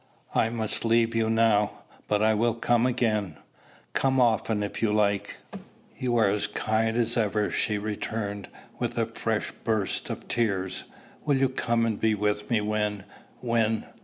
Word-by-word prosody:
"I 110 - +2
must 110 -2 -2
leave 115 0 +3
you 115 -1 +1
now; 110 -2 +2 0.2
but 105 0 +1
I 110 0 +4
will 115 +2 +1
come 120 +1 +2
again, 110 - 0 0.6
come 135 -1 +2
often 110 -3 +2
if 100 - -5
you 110 -2 +2
like." 105 -1 +1 0.6
"You 120 -2 0
are 110 -3 +4
as 105 +1 +1
kind 110 +2 0
as 120 0 +1
ever!" 105 -2 +1
she 105 - +1
returned, 105 -1 -4 0.3
with - - -2
a - - +2
fresh - - -2
burst 110 -4 0
of - - -6
tears. 95 -5 -1 0.4
"Will 145 -3 +2
you 135 0 +3
come 120 -2 0
and 110 -2 -1
be 110 -1 +2
with 105 0 -1
me 115 -3 +2
when 105 -1 -1 0.4
when 115 -2 +1
110 Hz, 160 wpm, -27 LUFS, 105-115 Hz, 0.6 s, I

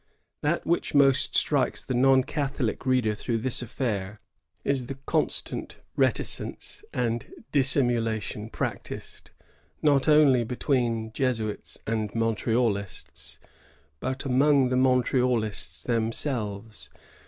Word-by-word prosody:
That 150 +4 0
which 170 -2 0
most 135 -2 +4
strikes - - +1
the - - -3
non 130 +1 +4
Catholic 135 -4 -2
reader 125 -4 +2
throughout 115 +2 -3
this 130 -1 0
affair 105 -4 -3 0.4
is 135 -3 0
the 135 - -5
constant - - -2 0.2
reticence - - -1
and 120 -2 -2 0.2
dissimulation 115 -6 +1
practised, - - -5 0.5
not 145 -2 +3
only 150 -5 +5
between 120 -2 -1
Jesuits 115 -5 -1
and 110 -2 -2
Montrealists, 115 -3 -1 0.6
but 130 - -3
among 135 0 +3
the 125 - 0
Montrealists 125 -4 +1
themselves. 115 -2 -2
125 Hz, 100 wpm, -26 LUFS, 110-135 Hz, 0.6 s, only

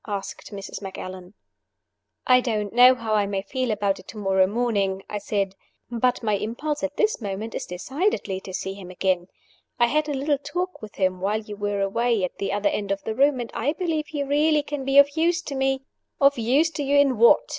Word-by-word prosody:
asked 200 0 -5
Mrs. 195 0 -7
Macallan. 185 -1 -8 0.9
"I 255 0 +6
don't 210 -4 -2
know 250 +2 +8
how 225 -3 -3
I 205 -1 +2
may 195 -1 -2
feel 255 +4 -2
about 200 -3 0
it 185 - -15
tomorrow 195 -3 +1
morning," 200 -4 0
I 210 - -4
said; 200 -2 -1 0.4
"but 245 +1 +1
my 215 -2 +1
impulse 290 +9 -3
at 290 0 -3
this 430 - +1
moment 205 +2 -4
is - - -4
decidedly 200 - -2
to 190 - -9
see 190 +1 -4
him 195 -2 -10
again. 185 -1 0 0.5
I 240 - +6
had 305 +5 0
a 290 - -1
little 280 +1 0
talk 360 +5 -4
with 215 -1 -10
him 185 -1 0
while 210 +3 0
you 210 -1 -8
were 205 -1 -2
away 230 +2 +1
at 180 - -3
the 195 - -1
other 205 0 +1
end 200 -1 -3
of 195 0 -2
the 220 - -2
room, 275 +2 +3
and 235 -1 -5
I 280 +6 0
believe 320 -3 -2
he 290 -2 -3
really 295 +2 +2
can 290 -2 -5
be 270 +1 +2
of 280 +1 +7
use 335 +1 +1
to 285 - -5
me 270 0 0 0.2
" - - -55
"Of 280 0 +5
use 275 +8 +3
to 295 - -3
you 280 +1 +2
in 275 -5 +3
what?" 235 - +7
230 Hz, 220 wpm, -24 LUFS, 200-280 Hz, 0.9 s, know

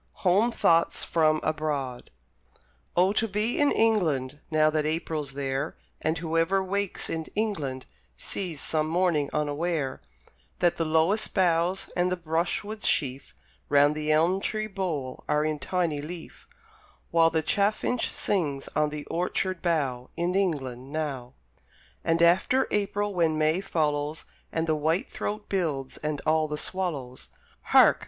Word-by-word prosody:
HOME 200 +7 +4
THOUGHTS 170 -6 +2
FROM 155 -2 +2
ABROAD 145 -5 -2 0.9
Oh, 185 +3 +4
to 225 +1 +1
be 210 +3 -1
in 290 -1 +4
England 155 -12 +1
Now 155 -1 +3
that 155 -1 +1
April's 155 -2 -2
there, 135 -1 -2 0.2
And 160 +1 0
whoever 165 +4 +1
wakes 200 0 -2
in 160 -1 -3
England 155 -12 -2 0.3
Sees, 175 -7 -4
some 155 -1 0
morning, 165 -4 +1
unaware, 150 -1 -1 0.6
That 175 -1 +2
the 165 - 0
lowest 160 +7 +2
boughs 180 0 +1
and 180 0 +1
the 185 - 0
brushwood 175 +6 -2
sheaf 130 - 0 0.3
Round 145 +1 +5
the 155 0 -1
elm 165 +5 +3
tree 215 +1 -1
bole 175 -11 -4
are 150 +1 +2
in 155 -1 -1
tiny 160 -1 -1
leaf, 165 +2 -9 0.6
While 165 -1 +5
the 160 -1 0
chaffinch 210 +6 +1
sings 150 -9 -1
on 150 0 +1
the 150 -1 -6
orchard 180 +1 -1
bough 140 -8 -1
In 175 +1 0
England 135 -9 -1
now! 135 -5 -4 0.7
And 165 +1 +2
after 190 +10 +4
April, 205 0 0
when 165 -3 +2
May 155 +4 +2
follows, 150 -4 -1 0.3
And 165 0 0
the 160 - +1
white 160 +5 0
throat 210 0 -4
builds, 155 -9 -2
and 150 -1 -3
all 155 0 +3
the 150 0 -3
swallows! 150 -10 -3 0.4
Hark! - - +6
160 Hz, 140 wpm, -27 LUFS, 150-185 Hz, 0.9 s, Hark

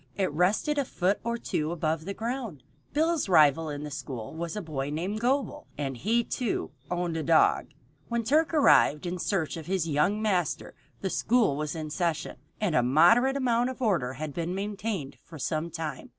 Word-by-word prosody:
It 190 -4 0
rested 195 - +1
a - - +2
foot 195 -3 0
or 235 +1 -1
two 155 -8 -2
above 160 -1 -1
the 200 +1 -4
ground. 230 - -4 0.3
Bill's 320 - +1
rival 155 -2 +5
in 145 0 -5
the 150 - -6
school 130 -6 -6
was 165 +2 -4
a 210 - -3
boy 145 -4 -3
named 180 +8 -2
Gobel, 275 +5 -1
and 135 -2 -3
he, 225 - +1
too, 235 -7 -2 0.2
owned 175 -2 -1
a - - -1
dog. 160 +1 +3 0.4
When 235 -1 -1
Turk 305 +8 +2
arrived 275 - +4
in 180 +1 -3
search 170 -4 -1
of 160 - -8
his 185 -3 0
young 165 +8 +2
master 185 -7 -1 0.3
the 190 - -2
school 230 - +2
was 150 +1 -3
in 155 -2 -5
session, 170 -1 -2 0.2
and 210 -6 0
a 125 - +4
moderate 175 - +5
amount 245 -2 +1
of 260 - -7
order 175 - +1
had 150 +2 -5
been 170 +3 -3
maintained 200 -7 -4
for 165 - -11
some 155 +4 -2
time. 155 -4 -5
175 Hz, 190 wpm, -28 LUFS, 155-225 Hz, 0.4 s, rival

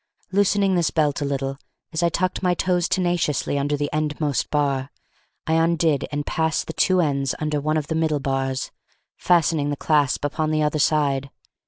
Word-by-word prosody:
Loosening 200 0 +2
this 170 -4 +2
belt 150 -2 0
a - - 0
little, 135 -1 -3 0.3
as 160 - -1
I 170 - +3
tucked 185 +3 -1
my 180 -1 +2
toes 180 -1 0
tenaciously 175 -6 0
under 145 +1 0
the 145 0 -1
endmost 150 -2 -1
bar, 140 -2 0 0.6
I 160 - 0
undid 165 -3 +2
and 145 0 -3
passed 160 0 0
the 160 - -6
two 185 +1 +3
ends 140 -4 0
under 150 -1 -2
one 155 +2 0
of 155 - -1
the 160 - -3
middle 160 -2 +1
bars, 135 -1 -2 0.4
fastening 165 -4 +2
the 145 - -1
clasp 145 -2 +1
upon 155 +2 -1
the 155 0 +1
other 150 0 0
side. 140 -2 +1
155 Hz, 180 wpm, -23 LUFS, 145-165 Hz, 0.6 s, I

